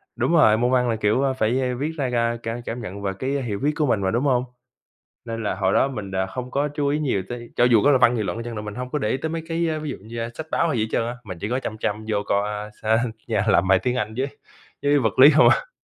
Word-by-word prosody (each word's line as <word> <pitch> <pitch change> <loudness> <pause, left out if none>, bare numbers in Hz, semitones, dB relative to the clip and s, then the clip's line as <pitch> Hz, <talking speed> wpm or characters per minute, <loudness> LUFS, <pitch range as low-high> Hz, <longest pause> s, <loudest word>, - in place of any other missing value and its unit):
đúng - - 0
rồi, 110 -9 +6
môn 120 +2 +1
văn 125 -2 +2
là, 115 - +1
kiểu, 110 +5 +1
a, 135 - +1
phải, 125 +1 0
a, 125 -1 -1
viết 150 +3 -1
ra 135 -4 -1
ca 115 0 +1
cả 115 +1 -3
cảm 120 +1 -4
nhận 100 -1 -7
về 100 - -1
cái 130 - -2
hiểu 120 -8 -2
viết 145 +2 +2
của 150 - +1
mình 110 -7 +1
mà, 95 - 0
đúng 120 +4 0
hông? 125 -3 +2 0.8
Nên 115 -1 -4
là 100 - -1
hồi 95 0 +1
đó 135 - +4
mình 105 -7 -6
đ 95 - -5
không 125 -1 -6
có 145 +1 0
chú 145 0 -2
ý 145 +2 +1
nhiều 130 -10 0
tới, 120 -1 -7
cho - - +3
dù 115 -4 +5
có 145 - +5
là 135 - +5
văn 125 -1 +4
nghị 110 - -1
luận 95 +3 -3
đi 115 - -5
chăng 120 -1 -6
nữa 105 - -4
mình 105 -1 -7
hông 125 +1 -5
có 150 - -2
để 105 - -1
ý 130 - 0
tới 160 +3 -3
mấy 165 0 -4
cái, 165 0 0
a, 155 - -1
ví 155 -1 -5
dụ - - -5
như, 115 +3 -8
a, 115 0 -3
sách 160 - -6
báo 170 - +2
hay 140 - 0
gì 110 - +1
hết 110 - -4
trơn - - +1
á, 120 - -4
mà 95 -5 -7
chỉ 105 - -4
có 125 +2 0
chăm 110 - -5
chăm 110 0 -3
vô 105 -2 0
coi, 100 +1 0
a, 105 0 -5 0.3
sên 120 -1 -2 0.2
yeah, 110 -1 0
làm 95 -1 +3
bài 95 0 +5
tiếng 125 0 -1
Anh 110 -3 -2
với 135 - 0 0.5
với 145 0 +3
vật 110 -3 -1
lý 140 +3 +10
không 155 - +6
à. - - 0
120 Hz, 325 wpm, -23 LUFS, 110-140 Hz, 0.8 s, lý